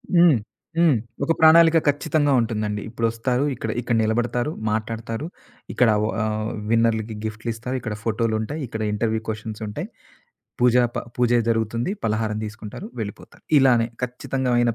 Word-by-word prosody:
హ్మ్. 170 -6 +6 0.4
హ్మ్. 165 -6 +5 0.3
ఒక 140 - +1
ప్రణాళిక 165 +1 +7
ఖచ్చితంగా 145 0 +2
ఉంటుందండి. 105 -2 -2
ఇప్పుడొస్తారు. 115 +3 0
ఇక్కడ - - -5
ఇక్కడ 120 -1 0
నిలబడతారు. 120 +5 0 0.2
మాట్లాడతారు. 115 +4 -3 0.5
ఇక్కడ 125 -2 +4 0.2
ఓహ్ - - -2
ఆహ్, 110 0 -1 0.2
విన్నర్‌లకి 115 -1 +1
గిఫ్ట్‌లిస్తారు. 115 +3 -4
ఇక్కడ 110 -3 -4
ఫోటోలుంటాయి. 115 +5 -1
ఇక్కడ 110 -1 -5
ఇంటర్‌వ్యూ 110 +1 0
క్వెషన్స్ 110 0 -5
ఉంటాయి. 105 - -5 0.7
పూజా 125 0 +5
ప - - 0 0.2
పూజ 125 -1 +2 0.2
జరుగుతుంది, 115 - 0
పలహారం 110 -1 0
తీసుకుంటారు, 110 - -8
వెళ్ళిపోతారు. 105 -2 -8
ఇలానే 125 -4 +4
ఖచ్చితంగామైన 125 -1 0
115 Hz, 125 wpm, -23 LUFS, 110-125 Hz, 0.7 s, ప్రణాళిక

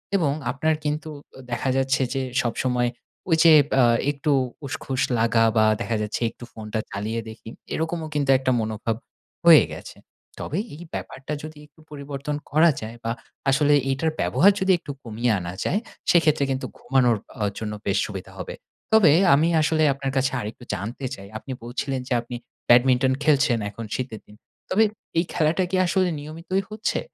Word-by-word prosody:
এবং 160 -7 +2 0.2
আপনার 155 +4 +1
কিন্তু 150 +1 -2 0.3
ও - - -11
দেখা 120 +3 -1
যাচ্ছে 135 0 +1
যে 135 - -1 0.2
সবসময় 125 0 0 0.4
ঐযে 160 0 +6 0.3
আ - - +6 0.3
একটু 145 +1 -1 0.3
উসখুস 135 0 -3 0.2
লাগা 115 0 +3
বা 110 - +5 0.2
দেখা 115 -1 -1
যাচ্ছে 105 +2 -3
একটু 120 - -14
ফোনটা 110 0 -4
চালিয়ে 110 +3 -3
দেখি, 110 0 -10 0.2
এরকমও 160 0 -2
কিন্তু 145 -2 0
একটা 130 0 0
মনোভাব 110 +1 -2 0.5
হয়ে 165 -3 +9
গেছে। - - -10 0.4
তবে 155 - -3 0.2
এই 165 - -10
ব্যাপারটা 135 +3 -6
যদি 155 -1 -8
একটু 150 - -29
পরিবর্তন 140 0 -5 0.2
করা 160 +2 +5
যায় 115 +2 -7
বা 115 - -1 0.4
আসলে 145 +1 +4 0.2
এইটার 155 +4 0
ব্যবহার 200 +3 +5
যদি 190 0 +2
একটু 145 - -7
কমিয়ে 115 +1 -1
আনা 85 -1 -6
যায়, 205 - +1 0.3
সেক্ষেত্রে 155 -4 +4
কিন্তু 130 0 -2
ঘুমানোর 125 -3 +2 0.2
অ - - +1 0.2
জন্য 105 -1 -4
বেশ 100 -1 +1
সুবিধা 95 -3 -7
হবে। - - -6 0.4
তবে 195 -9 +7 0.2
আমি 150 +4 +4
আসলে 155 +1 +2
আপনার 135 0 -4
কাছে 130 0 +2
আরেকটু 110 +2 -7
জানতে 115 +8 -5
চাই 100 0 -12
আপনি 130 - -9
বলছিলেন 130 +2 -3
যে - - -1
আপনি 120 +1 -8 0.3
ব্যাডমিন্টন 125 +1 +5
খেলছেন 140 -5 +3
এখন 115 +3 -8
শীতের 125 -4 -5
দিন, 105 - -16 0.3
তবে 205 +4 +4 0.3
এই 170 - +3
খেলাটা 160 +3 +2
কি - - +1
আসলে 185 +1 +2
নিয়মিতই 165 +6 -3
হচ্ছে? 215 +1 -2
135 Hz, 165 wpm, -24 LUFS, 115-155 Hz, 0.5 s, হয়ে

